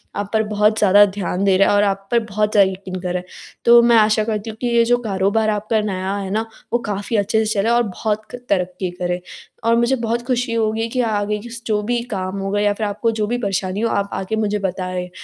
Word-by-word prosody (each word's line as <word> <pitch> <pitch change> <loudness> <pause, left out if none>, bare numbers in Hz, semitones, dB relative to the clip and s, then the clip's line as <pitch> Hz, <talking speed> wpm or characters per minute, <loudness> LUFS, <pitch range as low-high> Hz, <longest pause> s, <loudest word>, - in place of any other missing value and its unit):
आप 205 0 -3
पर 220 0 +3
बहुत 210 +1 +2
ज़्यादा 205 0 +6
ध्यान 195 -1 -3
दे 195 -2 +4
रहा 195 - +4
है - - +3
और 205 - +4
आप 195 -1 -1
पर 235 - +4
बहुत 210 -1 -1
ज़्यादा 200 -3 +4
यकीन 185 -1 -7
कर 180 -1 -3
रहा 180 - 0
है। - - -19 0.4
तो 235 0 +8
मैं 235 0 +4
आशा 215 0 +4
करती 215 0 -3
हूँ 220 - -8
कि 245 - 0
ये 235 -1 +3
जो 245 +1 +3
कारोबार 205 +1 +1
आपका 215 +1 0
नया 190 -1 -2
है 195 -1 -4
ना, 220 +2 0 0.3
वो 240 - +3
काफ़ी 205 +2 -3
अच्छे 220 +2 +1
से 215 - 0
चले 205 +1 +1
और 240 +1 +3
बहुत 215 +1 -2
क - - -6
तरक्की 185 -1 -1
करे। 180 0 -2 0.4
और 230 0 +3
मुझे 235 +3 +2
बहुत 230 +1 0
खुशी 245 -2 0
होगी 225 0 0
कि - - +3
आगे 205 0 -1
की 235 +3 -10
स 235 0 -8
जो 210 -2 +1
भी 240 +2 -1
काम 185 0 -3
होगा 195 +1 -1
या 205 0 +2
फ़िर 210 +1 -2
आपको 210 +3 -1
जो 215 -2 -2
भी 240 +3 -1
परेशानी 195 -3 -2
हो 230 - +1
आप 200 -2 -1
आके 190 +3 -3
मुझे 210 -1 0
बताएँ 185 -1 -3
210 Hz, 250 wpm, -20 LUFS, 195-225 Hz, 0.4 s, तो